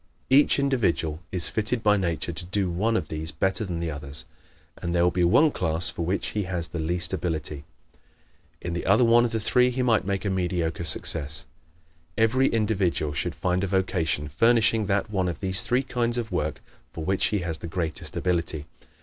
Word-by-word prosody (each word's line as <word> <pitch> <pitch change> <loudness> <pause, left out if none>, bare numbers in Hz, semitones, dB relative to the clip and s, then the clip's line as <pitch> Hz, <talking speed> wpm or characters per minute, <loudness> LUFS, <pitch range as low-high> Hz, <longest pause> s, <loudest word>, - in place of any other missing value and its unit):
Each 140 +2 +5
individual 110 - 0
is 90 -2 0
fitted 110 +2 -2
by 105 -1 +4
nature 85 -3 -2
to 85 +2 -5
do 95 0 -1
one 110 +6 0
of 80 -7 -4
these 80 0 -4
better 95 +6 -1
than 85 -3 -4
the 85 -1 -3
others 70 +1 -5 0.5
and 85 -1 -3
there 85 - +3
will 90 - +3
be 90 0 0
one 145 - +4
class 85 -4 +1
for 85 - -4
which 90 +4 -2
he 105 -2 -3
has 85 -2 -4
the 85 - -5
least 85 +3 -2
ability. 75 -5 -3 1.0
In 85 - -4
the 85 - -4
other 100 +6 +5
one 120 +1 +5
of 120 - -2
the 115 - -1
three 125 +4 +3
he 125 +1 -2
might 115 -4 +2
make 100 +1 -3
a 100 - 0
mediocre 90 -2 -2
success. 75 -1 +4 0.7
Every 125 +4 +3
individual 100 -9 0
should - - -3
find 90 +1 -1
a - - 0
vocation 90 -5 -1
furnishing 115 - +2
that 100 +2 -1
one 95 -3 0
of 85 - -4
these 95 +1 +2
three 125 +3 +1
kinds 120 -2 0
of 115 -3 -3
work 80 -4 -2 0.3
for 80 - -6
which 95 +2 +1
he 105 - 0
has 85 -2 -2
the - - -7
greatest 80 -2 -3
ability. 85 -4 -1
90 Hz, 200 wpm, -25 LUFS, 85-110 Hz, 1.0 s, Each